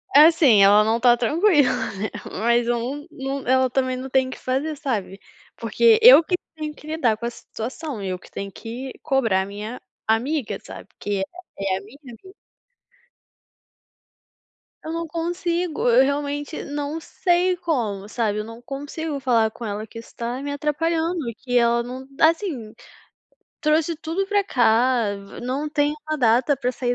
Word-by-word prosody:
Assim, 300 Hz, -8 st, +7 dB
ela 205 Hz, +2 st, +7 dB
não 220 Hz, +2 st, +1 dB
tá 240 Hz, 0 st, +5 dB
tranquila, 295 Hz, -, +3 dB, 0.3 s
né, 215 Hz, -, -2 dB, 0.3 s
mas 235 Hz, +1 st, +2 dB
om 250 Hz, +5 st, -2 dB
num 275 Hz, -2 st, -5 dB
ela 260 Hz, 0 st, +3 dB
também 255 Hz, 0 st, 0 dB
não 260 Hz, +1 st, -6 dB
tem 260 Hz, 0 st, +2 dB
o -, -, -7 dB
que -, -, -7 dB
fazer, 275 Hz, +5 st, -2 dB
sabe. 205 Hz, -8 st, -3 dB, 0.4 s
Porque 455 Hz, -1 st, +4 dB
eu 460 Hz, -7 st, +10 dB
que 360 Hz, -, 0 dB, 0.2 s
tenho 305 Hz, -1 st, -5 dB
que 300 Hz, -, -15 dB
lidar 270 Hz, -9 st, +1 dB
com 235 Hz, -, -6 dB
a -, -, 0 dB
situação, 240 Hz, +2 st, -7 dB
eu 185 Hz, -2 st, -3 dB
que -, -, -18 dB
tenho 195 Hz, 0 st, -6 dB
que 245 Hz, +6 st, -7 dB
cobrar 250 Hz, -10 st, +2 dB
a -, -, -3 dB
minha 210 Hz, +4 st, -7 dB, 0.3 s
amiga, 225 Hz, 0 st, 0 dB
sabe, -, -, -10 dB
porque 200 Hz, -2 st, -3 dB, 0.3 s
é 195 Hz, -1 st, -1 dB
a -, -, -7 dB
minha 215 Hz, +7 st, -15 dB
amiga. 265 Hz, -, -13 dB, 2.5 s
Eu 315 Hz, -, -5 dB
não 335 Hz, 0 st, -3 dB
consigo, 340 Hz, -2 st, -1 dB
eu 245 Hz, +2 st, +6 dB
realmente 290 Hz, +2 st, -2 dB
não 290 Hz, +2 st, -4 dB
sei 360 Hz, +2 st, +1 dB
como, 235 Hz, -, -2 dB
sabe, 215 Hz, -2 st, -1 dB
eu -, -, -2 dB
não 230 Hz, +1 st, -10 dB
consigo 290 Hz, +3 st, -5 dB
falar 235 Hz, -4 st, +2 dB
com 235 Hz, -, -8 dB
ela 210 Hz, +1 st, -4 dB
que 230 Hz, -, -12 dB
isso 230 Hz, -, -14 dB
tá 240 Hz, +2 st, -4 dB
me 285 Hz, 0 st, -4 dB
atrapalhando, 320 Hz, +2 st, -1 dB
e -, -, -6 dB
que 245 Hz, +2 st, -2 dB
ela 235 Hz, 0 st, +3 dB
não 255 Hz, +2 st, -7 dB
Assim, 320 Hz, -, +1 dB, 0.9 s
trouxe 315 Hz, +2 st, +1 dB
tudo 330 Hz, +5 st, -2 dB
pra 405 Hz, -1 st, +2 dB
cá, 240 Hz, -, +2 dB, 0.3 s
não 265 Hz, +5 st, -2 dB
tem 295 Hz, 0 st, +1 dB
uma 310 Hz, -, 0 dB
data 245 Hz, +2 st, +3 dB
pra 250 Hz, -1 st, -1 dB
sair 245 Hz, -1 st, -1 dB
260 Hz, 165 wpm, -23 LUFS, 230-310 Hz, 2.5 s, eu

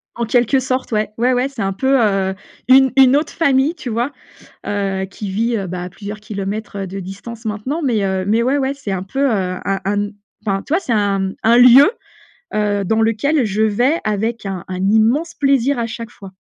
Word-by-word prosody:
En 235 Hz, -, -2 dB
quelque 245 Hz, +3 st, +2 dB
sorte, 260 Hz, 0 st, -2 dB
ouais. 215 Hz, -1 st, 0 dB
Ouais, 245 Hz, +2 st, +2 dB
ouais, 255 Hz, +2 st, 0 dB
c'est 260 Hz, -6 st, -7 dB
un 195 Hz, 0 st, -1 dB
peu, 265 Hz, +6 st, +2 dB
heu, 195 Hz, -3 st, +1 dB, 0.3 s
une 265 Hz, 0 st, +6 dB
une 265 Hz, 0 st, +6 dB
autre 295 Hz, +2 st, 0 dB
famille, 280 Hz, -1 st, +2 dB
tu 300 Hz, -7 st, -7 dB
vois, 240 Hz, +5 st, -1 dB, 0.6 s
heu, 195 Hz, -2 st, -1 dB
qui 195 Hz, +1 st, -7 dB
vit, 230 Hz, +5 st, 0 dB
heu, 195 Hz, -3 st, -3 dB
bah, 180 Hz, 0 st, -5 dB
à -, -, -5 dB
plusieurs 205 Hz, +2 st, -8 dB
kilomètres 200 Hz, -1 st, -5 dB
de 195 Hz, +2 st, -6 dB
distance, 200 Hz, +5 st, -9 dB
maintenant. 225 Hz, +9 st, -3 dB
Mais, 235 Hz, -7 st, +1 dB
heu, 190 Hz, -1 st, -1 dB
mais, 220 Hz, +3 st, +2 dB
ouais, 260 Hz, +4 st, +1 dB
ouais, 270 Hz, -1 st, 0 dB
c'est 275 Hz, -8 st, -6 dB
un 185 Hz, -1 st, -2 dB
peu, 195 Hz, +8 st, -5 dB
heu, 280 Hz, -1 st, +3 dB, 0.3 s
un 195 Hz, -1 st, -1 dB
un 200 Hz, +2 st, 0 dB
n 205 Hz, 0 st, -2 dB, 0.3 s
enfin, 195 Hz, -1 st, 0 dB
tu -, -, -8 dB
vois, 340 Hz, -, +3 dB
c'est 250 Hz, -, -3 dB
un 195 Hz, -2 st, 0 dB
un 230 Hz, +2 st, +5 dB
lieu, 250 Hz, +7 st, +8 dB, 0.6 s
heu, 205 Hz, -1 st, 0 dB
dans 220 Hz, +4 st, +1 dB
lequel 235 Hz, +7 st, +1 dB
je 210 Hz, +1 st, 0 dB
vais 245 Hz, +9 st, +2 dB
avec 215 Hz, +2 st, -2 dB
un 190 Hz, -3 st, -4 dB
un 185 Hz, -1 st, -4 dB
immense 235 Hz, +11 st, +2 dB
plaisir 275 Hz, -1 st, +2 dB
à 235 Hz, -1 st, -1 dB
chaque 230 Hz, 0 st, -7 dB
fois. 195 Hz, -2 st, -12 dB
220 Hz, 215 wpm, -18 LUFS, 200-260 Hz, 0.6 s, lieu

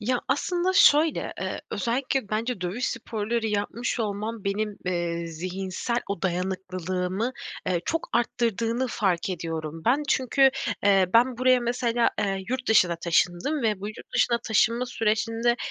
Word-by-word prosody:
Ya 245 Hz, +3 st, 0 dB
aslında 350 Hz, +6 st, +1 dB
şöyle, 310 Hz, -3 st, +4 dB
eee, -, -, -3 dB
özellikle 255 Hz, -1 st, -1 dB
bence 225 Hz, 0 st, -2 dB
dövüş 195 Hz, +8 st, -2 dB
sporları 225 Hz, -1 st, -2 dB
yapmış 220 Hz, +4 st, -2 dB
olmam 215 Hz, +1 st, -3 dB
benim, 205 Hz, +1 st, -1 dB
eee, 170 Hz, -1 st, -1 dB
zihinsel 185 Hz, +7 st, -4 dB
o 200 Hz, -2 st, -4 dB
dayanıklılığımı, 185 Hz, +3 st, -2 dB, 0.3 s
eee, 175 Hz, -2 st, +1 dB
çok 330 Hz, 0 st, -2 dB
arttırdığını 235 Hz, +1 st, 0 dB
fark 190 Hz, -4 st, 0 dB
ediyorum 165 Hz, -2 st, -4 dB
ben. 265 Hz, +6 st, +3 dB
Çünkü, 265 Hz, +1 st, +4 dB, 0.3 s
eee, 195 Hz, -2 st, +5 dB
ben 240 Hz, +1 st, +4 dB
buraya 255 Hz, 0 st, +4 dB
mesela, 240 Hz, 0 st, +1 dB
eee, 195 Hz, -2 st, -1 dB
yurt 255 Hz, 0 st, -3 dB
dışına 180 Hz, -6 st, +4 dB
taşındım 175 Hz, -, +1 dB
ve 215 Hz, -4 st, 0 dB
bu 205 Hz, -, -4 dB
yurt 215 Hz, -, -11 dB
dışına 235 Hz, -1 st, +3 dB
taşınma 230 Hz, +3 st, +2 dB
sürecinde, 230 Hz, +1 st, 0 dB
220 Hz, 140 wpm, -26 LUFS, 185-245 Hz, 0.3 s, eee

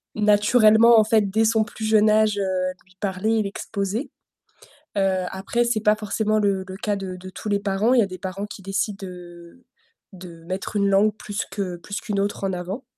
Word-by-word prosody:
naturellement, 215 Hz, +2 st, +5 dB
en -, -, +5 dB
fait, 215 Hz, -2 st, +2 dB
dès 220 Hz, +3 st, +2 dB
son 220 Hz, 0 st, +3 dB
plus 220 Hz, 0 st, -7 dB
jeune 215 Hz, 0 st, +4 dB
âge, 215 Hz, -1 st, +3 dB
heu, 185 Hz, -1 st, -1 dB
lui 185 Hz, 0 st, -25 dB
parler, 200 Hz, +3 st, -1 dB
et -, -, +1 dB
l'exposer. 200 Hz, +4 st, -4 dB, 0.9 s
Heu, 190 Hz, -2 st, +1 dB
après, 195 Hz, +5 st, -1 dB
c'est 235 Hz, -2 st, 0 dB
pas 210 Hz, 0 st, +4 dB
forcément 215 Hz, 0 st, -1 dB
le 200 Hz, -2 st, +1 dB
le 185 Hz, -, -8 dB
cas 210 Hz, 0 st, -1 dB
de 190 Hz, -2 st, -5 dB
de 185 Hz, +1 st, -10 dB
tous 210 Hz, -, -7 dB
les 205 Hz, -1 st, +1 dB
parents. 200 Hz, +4 st, +1 dB
Il 255 Hz, -, +5 dB
y 230 Hz, -, +5 dB
a -, -, +1 dB
des 185 Hz, -1 st, -8 dB
parents 190 Hz, +2 st, -5 dB
qui 205 Hz, -, -10 dB
décident, 195 Hz, +1 st, -3 dB
heu, 175 Hz, +4 st, -12 dB, 0.5 s
de 175 Hz, -3 st, -12 dB
mettre 185 Hz, +4 st, -5 dB
une 200 Hz, -1 st, +2 dB
langue 200 Hz, +2 st, +3 dB
plus 205 Hz, +1 st, -4 dB
que 195 Hz, -3 st, -3 dB
plus 200 Hz, +4 st, -6 dB
qu'une 210 Hz, -4 st, -2 dB
autre 200 Hz, 0 st, -2 dB
en 195 Hz, -1 st, -1 dB
avant. 185 Hz, +8 st, -5 dB
200 Hz, 210 wpm, -23 LUFS, 190-215 Hz, 0.9 s, naturellement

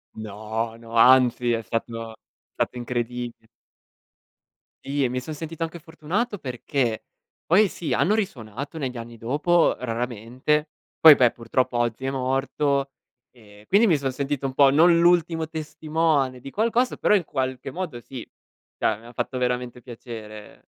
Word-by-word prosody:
No, 110 Hz, +2 st, -4 dB
no, 115 Hz, 0 st, -13 dB
anzi 125 Hz, 0 st, +5 dB
è 115 Hz, -1 st, 0 dB
stato 115 Hz, 0 st, -4 dB, 0.4 s
stato -, -, -2 dB
incredi 120 Hz, 0 st, -3 dB, 1.5 s
Sì, 140 Hz, 0 st, 0 dB
e 130 Hz, -, +1 dB
mi 125 Hz, +1 st, -2 dB
son 140 Hz, +5 st, -7 dB
sentito 160 Hz, +2 st, -5 dB
anche 165 Hz, +1 st, -5 dB
fortunato 180 Hz, +9 st, -3 dB
perché 125 Hz, -, -2 dB, 0.4 s
poi 200 Hz, +6 st, +5 dB
sì, 170 Hz, -3 st, -4 dB
hanno 205 Hz, -, +2 dB
risuonato 140 Hz, -, -4 dB
negli 130 Hz, -5 st, -4 dB
anni 115 Hz, 0 st, -8 dB
dopo, 150 Hz, +9 st, +2 dB
raramente, 125 Hz, +5 st, -2 dB, 0.3 s
poi 160 Hz, -2 st, +10 dB
beh 125 Hz, -3 st, +4 dB
purtroppo 120 Hz, +1 st, -1 dB
oggi 120 Hz, +2 st, -1 dB
è 135 Hz, -, 0 dB
morto 135 Hz, +1 st, 0 dB, 0.4 s
e 105 Hz, -3 st, -18 dB
quindi 210 Hz, +4 st, +5 dB
mi 165 Hz, -6 st, +4 dB
son 135 Hz, -2 st, -2 dB
sentito 140 Hz, +1 st, -3 dB
un 135 Hz, -, -2 dB
po' 140 Hz, 0 st, +6 dB
non 170 Hz, +4 st, +5 dB
l'ultimo 170 Hz, -2 st, +3 dB
testimone 155 Hz, -4 st, -1 dB
di 135 Hz, +2 st, -9 dB
qualcosa, 235 Hz, -, +1 dB
però -, -, +3 dB
in 195 Hz, -, +2 dB
qualche 130 Hz, -1 st, -3 dB
modo 165 Hz, -8 st, -5 dB
sì, 125 Hz, 0 st, -9 dB, 0.5 s
cioè 110 Hz, -, 0 dB
mi 115 Hz, -, -17 dB
ha 120 Hz, -, -13 dB
fatto 130 Hz, -, -3 dB
veramente 125 Hz, 0 st, -2 dB
piacere. 110 Hz, -3 st, -10 dB
130 Hz, 150 wpm, -24 LUFS, 120-155 Hz, 1.5 s, poi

